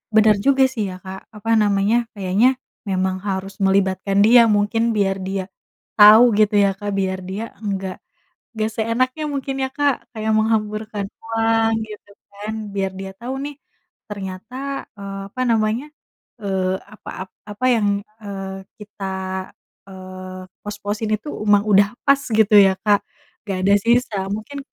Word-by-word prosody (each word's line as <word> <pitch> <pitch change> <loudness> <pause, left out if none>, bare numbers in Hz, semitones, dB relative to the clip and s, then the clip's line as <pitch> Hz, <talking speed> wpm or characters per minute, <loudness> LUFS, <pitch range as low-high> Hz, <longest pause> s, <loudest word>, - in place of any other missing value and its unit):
bener 215 -1 +6
juga 270 +5 +4
sih 215 -6 -2
ya, 185 - -6
Kak. 190 0 -9
Apa 210 +2 -6
namanya, 210 +3 +2
kayaknya 205 +7 +2 0.3
memang 190 -1 0
harus 195 0 -3
melibatkan 195 0 +1
dia, 235 +1 +7
mungkin 210 +2 +2
biar 195 -2 +1
dia 190 0 -3 0.6
tau 220 +3 +9
gitu 210 -1 +3
ya, 200 - +3
Kak, 205 0 -3
biar 190 -1 -1
dia 195 +4 -4 0.2
nggak 195 -3 -3 0.6
nggak 215 0 0
seenaknya 255 +7 0
mungkin 275 -1 -3
ya, - - -4
Kak, 285 -3 0
kayak 220 -1 -2
menghamburkan 215 -1 0 0.2
uang 225 0 +1
gitu 210 -1 -12 0.2
kan. 205 +2 -6 0.2
Biar 195 -1 -1
dia 190 0 -6
tau 245 +3 -5
nih 290 0 -5 0.5
ternyata, 195 +3 -7 0.4
eee, 195 0 -6
apa 255 - -5
namanya, 225 +2 +1 0.6
eee, 190 -2 0
apa, 215 - -12 0.2
ap - - -45 0.2
apa 210 +4 -4
yang, 205 -4 +2 0.2
eee, 195 -1 -6 0.2
kita, 200 -2 -6 0.7
eee, 185 0 -9 0.2
pos-posin 205 +1 -4
itu 215 +7 -3 0.2
emang 205 -1 +5
udah 200 0 +5 0.2
pas 275 0 +6 0.2
gitu 215 -1 +4
ya, 195 -1 +7
Kak. 205 -1 +4 0.5
Nggak 195 -2 -2
ada 200 +2 +4
sisa 235 0 +1 0.2
mungkin 220 +7 -6
205 Hz, 145 wpm, -21 LUFS, 195-225 Hz, 0.7 s, tau